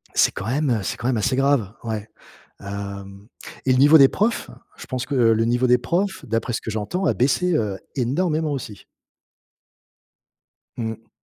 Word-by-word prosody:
C'est -, -, +4 dB
quand 95 Hz, -, -6 dB
même, 140 Hz, +4 st, 0 dB
heu, 110 Hz, -3 st, +1 dB
c'est -, -, -3 dB
quand 120 Hz, -, -3 dB
même 125 Hz, -3 st, +1 dB
assez 110 Hz, +4 st, +1 dB
grave, 135 Hz, -7 st, +2 dB
ouais. 110 Hz, -2 st, -4 dB, 0.5 s
Hem 100 Hz, 0 st, -7 dB, 0.4 s
et 130 Hz, -, +3 dB
le 125 Hz, -, +3 dB
niveau 145 Hz, +4 st, +8 dB
des 135 Hz, -3 st, +8 dB
profs, 215 Hz, -, -1 dB, 0.3 s
je -, -, -9 dB
pense 130 Hz, -1 st, -4 dB
que 145 Hz, -, -2 dB
le 115 Hz, -2 st, +3 dB
niveau 120 Hz, +2 st, +1 dB
des 125 Hz, 0 st, +5 dB
profs, 180 Hz, +6 st, -1 dB
d'après 115 Hz, 0 st, -2 dB
ce 115 Hz, -, -2 dB
que -, -, -6 dB
j'entends, 110 Hz, -, -2 dB
a -, -, +3 dB
baissé, 165 Hz, +8 st, +1 dB
heu, 105 Hz, -7 st, -1 dB, 0.2 s
énormément, 155 Hz, +5 st, 0 dB
aussi. 120 Hz, -7 st, -6 dB, 1.9 s
Mmh. 110 Hz, -1 st, -5 dB
120 Hz, 175 wpm, -22 LUFS, 110-145 Hz, 1.9 s, niveau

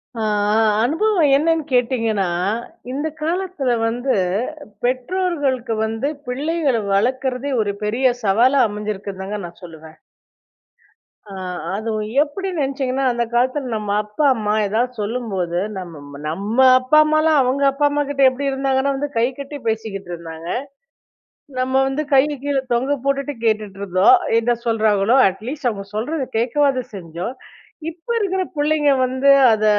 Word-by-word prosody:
ஆ, 225 Hz, -, -4 dB, 0.4 s
ஆ, -, -, +4 dB, 0.2 s
அனுபவம் 325 Hz, -, +2 dB
என்னன்னு 325 Hz, +2 st, +2 dB
கேட்டீங்கன்னா, 230 Hz, -5 st, +1 dB, 0.6 s
இந்த 290 Hz, +4 st, -2 dB
காலத்தில 340 Hz, -4 st, -1 dB, 0.2 s
வந்து 245 Hz, +4 st, -1 dB, 0.7 s
பெற்றோர்களுக்கு 265 Hz, -2 st, -1 dB
வந்து 225 Hz, +5 st, -2 dB, 0.2 s
பிள்ளைகள 285 Hz, +1 st, 0 dB, 0.2 s
வளர்க்குறதே 255 Hz, +5 st, 0 dB
ஒரு 205 Hz, -1 st, -1 dB
பெரிய 235 Hz, +5 st, +1 dB, 0.2 s
சவாலா 240 Hz, +8 st, +4 dB
அமைஞ்சிருக்குன்னுதாங்க, 205 Hz, -1 st, -5 dB
நான் 170 Hz, +2 st, -12 dB
சொல்லுவேன். 160 Hz, -2 st, -12 dB, 1.3 s
ஆ -, -, -8 dB, 0.4 s
அதுவும் 215 Hz, -1 st, -3 dB
எப்டி 345 Hz, +6 st, -4 dB
நெனைச்சிங்கன்னா 270 Hz, -2 st, -1 dB
அந்த 240 Hz, 0 st, 0 dB
காலத்தில 255 Hz, +2 st, 0 dB
நம்ம 210 Hz, -1 st, -4 dB
அப்பா 210 Hz, +8 st, -3 dB
அம்மா 210 Hz, -3 st, -1 dB
ஏதாவது 235 Hz, +5 st, 0 dB
சொல்லும்போது, 205 Hz, -6 st, -2 dB, 0.2 s
நம்ம 145 Hz, -6 st, -9 dB
நம்ம 200 Hz, +9 st, -3 dB, 0.2 s
அப்பா 255 Hz, +4 st, +3 dB
அம்மாலாம் 310 Hz, -1 st, +3 dB
அவங்க 260 Hz, +2 st, 0 dB
அப்பா 285 Hz, +2 st, +1 dB
அம்மாகிட்ட 285 Hz, -1 st, -1 dB
எப்டி 265 Hz, +2 st, -5 dB
இருந்தாங்கன்னா 270 Hz, 0 st, 0 dB
வந்து, 290 Hz, +2 st, -2 dB
கை 230 Hz, -, +3 dB
கட்டி 280 Hz, +1 st, -7 dB
பேசிக்கிட்டு 215 Hz, -4 st, -3 dB
இருந்தாங்க. 165 Hz, -1 st, -9 dB, 1.1 s
நம்ம 255 Hz, +1 st, -1 dB
வந்து 280 Hz, +3 st, -2 dB
கைய 290 Hz, +2 st, +3 dB
கீழே 280 Hz, -2 st, 0 dB
தொங்க 260 Hz, +4 st, +1 dB
போட்டுட்டு 275 Hz, +1 st, 0 dB
கேட்டுட்டுருந்தோம். 200 Hz, -, +3 dB, 0.2 s
என்ன 240 Hz, +1 st, +1 dB
சொல்கிறாங்களோ 220 Hz, 0 st, +2 dB
அட்லீஸ்ட் 245 Hz, +9 st, -4 dB
அவங்க 200 Hz, -3 st, -7 dB
சொல்றத 265 Hz, +5 st, -2 dB
கேட்கவாது 260 Hz, +2 st, +1 dB
செஞ்சோம். 175 Hz, +5 st, -6 dB, 0.6 s
இப்ப 330 Hz, +3 st, -19 dB
இருக்ற 380 Hz, -3 st, 0 dB
புள்ளைங்க 295 Hz, 0 st, +2 dB
வந்து 260 Hz, +2 st, +2 dB, 0.2 s
அத 215 Hz, -1 st, +1 dB
255 Hz, 125 wpm, -20 LUFS, 210-285 Hz, 1.3 s, ஆ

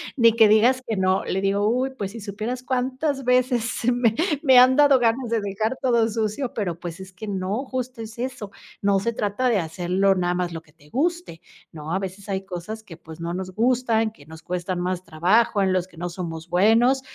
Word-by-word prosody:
ni 230 Hz, -3 st, +5 dB
que 225 Hz, -1 st, +6 dB
digas 235 Hz, +5 st, +4 dB
que 220 Hz, -, -1 dB
no". 190 Hz, 0 st, +1 dB
Le 190 Hz, -, -1 dB
digo: 200 Hz, +1 st, +1 dB
"Uy, 255 Hz, +3 st, 0 dB
pues 200 Hz, -3 st, -4 dB
si 230 Hz, +1 st, -9 dB
supieras 215 Hz, +5 st, -5 dB
cuántas 260 Hz, +2 st, -2 dB
veces 250 Hz, -2 st, +2 dB
se 230 Hz, +1 st, 0 dB
me 240 Hz, -2 st, +2 dB, 0.3 s
me 260 Hz, -4 st, +6 dB
han 255 Hz, +1 st, +6 dB
dado 285 Hz, -2 st, +6 dB
ganas 235 Hz, +1 st, +1 dB
de 230 Hz, -1 st, 0 dB
dejar 215 Hz, +5 st, -2 dB
todo 235 Hz, -3 st, +3 dB
sucio". 220 Hz, +4 st, -2 dB
Pero 175 Hz, -6 st, -3 dB
pues 175 Hz, +1 st, -7 dB
es 190 Hz, -, -10 dB
que 185 Hz, +4 st, -9 dB
no, 200 Hz, +6 st, -2 dB
justo 255 Hz, -2 st, -5 dB
es 220 Hz, +1 st, -9 dB
eso. 245 Hz, -5 st, -5 dB, 0.3 s
No 200 Hz, -1 st, +2 dB
se 235 Hz, -, 0 dB
trata 220 Hz, +3 st, -1 dB
de 230 Hz, -, +2 dB
hacerlo 180 Hz, +4 st, +1 dB
nada 175 Hz, -1 st, 0 dB
más 175 Hz, -1 st, -2 dB
lo 165 Hz, -, -6 dB
que 155 Hz, -, -25 dB
te 150 Hz, -2 st, -23 dB
guste. 335 Hz, -, -2 dB, 0.3 s
No, 155 Hz, 0 st, -7 dB
a 190 Hz, -, +1 dB
veces 195 Hz, +1 st, -7 dB
hay 195 Hz, 0 st, -2 dB
cosas 195 Hz, +4 st, -6 dB
que, 195 Hz, -, -12 dB
pues 160 Hz, 0 st, -11 dB
no 170 Hz, 0 st, -4 dB
nos 185 Hz, +1 st, -5 dB
gustan, 230 Hz, -2 st, +1 dB
que 145 Hz, -9 st, -18 dB
nos 160 Hz, 0 st, -12 dB
cuestan 180 Hz, 0 st, -3 dB
más 180 Hz, 0 st, -2 dB
trabajo, 185 Hz, +7 st, +2 dB
en 190 Hz, -1 st, +1 dB
los 185 Hz, 0 st, 0 dB
que 170 Hz, -, -20 dB
no 175 Hz, +1 st, -4 dB
somos 165 Hz, -2 st, -6 dB
buenos, 225 Hz, +9 st, +3 dB
210 Hz, 220 wpm, -23 LUFS, 185-245 Hz, 0.3 s, que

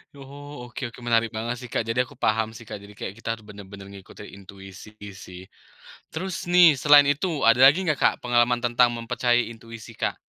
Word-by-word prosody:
Oh 140 Hz, -1 st, -11 dB
oke 125 Hz, 0 st, -7 dB
oke, 125 Hz, -, -15 dB
menarik 115 Hz, -1 st, +1 dB
banget 115 Hz, +2 st, -4 dB
sih 125 Hz, 0 st, -11 dB
Kak 115 Hz, -, -2 dB
jadi 125 Hz, +2 st, 0 dB
aku 130 Hz, 0 st, -17 dB
paham 110 Hz, -1 st, 0 dB
sih 115 Hz, 0 st, -13 dB
Kak, 110 Hz, -, -7 dB
jadi 100 Hz, -, -13 dB
kayak 95 Hz, -, -6 dB
kita 115 Hz, 0 st, -5 dB, 0.2 s
benar-benar 100 Hz, -1 st, -12 dB
ngikutin 100 Hz, +1 st, -13 dB, 0.2 s
intuisi 95 Hz, +2 st, -13 dB, 0.2 s
sih. 90 Hz, -1 st, -11 dB, 0.7 s
Terus 175 Hz, +1 st, -6 dB
nih, 175 Hz, -3 st, +6 dB
selain 145 Hz, +1 st, +5 dB
itu, 145 Hz, +6 st, 0 dB, 0.2 s
ada 115 Hz, +2 st, +4 dB
lagi 145 Hz, +8 st, +5 dB
nggak 150 Hz, -6 st, -1 dB
Kak -, -, +4 dB
pengalaman 120 Hz, 0 st, +1 dB
tentang 120 Hz, 0 st, +2 dB
mempercayai 120 Hz, +1 st, 0 dB
intuisi 115 Hz, 0 st, -12 dB
Kak? -, -, -3 dB
120 Hz, 185 wpm, -24 LUFS, 110-135 Hz, 0.7 s, nih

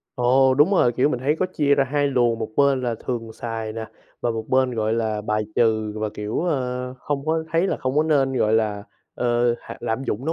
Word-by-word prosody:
Ồ, 130 Hz, +2 st, +4 dB
đúng 150 Hz, +7 st, +4 dB
rồi, 150 Hz, -11 st, +3 dB
kiểu, 125 Hz, +4 st, +2 dB
mình 125 Hz, -5 st, -2 dB
thấy 150 Hz, +4 st, +1 dB
có 185 Hz, -, +1 dB
chia 145 Hz, -6 st, +2 dB
ra 135 Hz, -, +2 dB
hai 145 Hz, +1 st, 0 dB
luồng, 120 Hz, -4 st, +2 dB
một 110 Hz, -, -3 dB
bên 140 Hz, -2 st, +3 dB
là 120 Hz, -2 st, -1 dB
thường 115 Hz, -3 st, -3 dB
xài 110 Hz, -1 st, -5 dB
nè 110 Hz, 0 st, -5 dB, 0.3 s
và 120 Hz, -, 0 dB
một 115 Hz, -1 st, -3 dB
bên, 130 Hz, -1 st, +2 dB
gọi 110 Hz, -1 st, 0 dB
là, 110 Hz, -2 st, -1 dB
bài 105 Hz, 0 st, 0 dB
trừ 110 Hz, -2 st, +2 dB
và, 110 Hz, 0 st, -1 dB
kiểu, 105 Hz, +1 st, -3 dB
ơ, 125 Hz, -6 st, -2 dB
không 140 Hz, +2 st, -3 dB
có 160 Hz, 0 st, 0 dB
thấy 165 Hz, +3 st, +3 dB
là -, -, -1 dB
không 130 Hz, +2 st, -3 dB
có 150 Hz, -, +5 dB
nên, 140 Hz, -4 st, +2 dB
gọi 110 Hz, -4 st, +1 dB
là, 105 Hz, -2 st, +1 dB, 0.3 s
ờ, 120 Hz, 0 st, +1 dB
hạ -, -, -9 dB
lạm 115 Hz, +4 st, -2 dB
dụng 115 Hz, +2 st, -3 dB
nó 160 Hz, -, 0 dB
125 Hz, 240 wpm, -23 LUFS, 115-140 Hz, 0.3 s, có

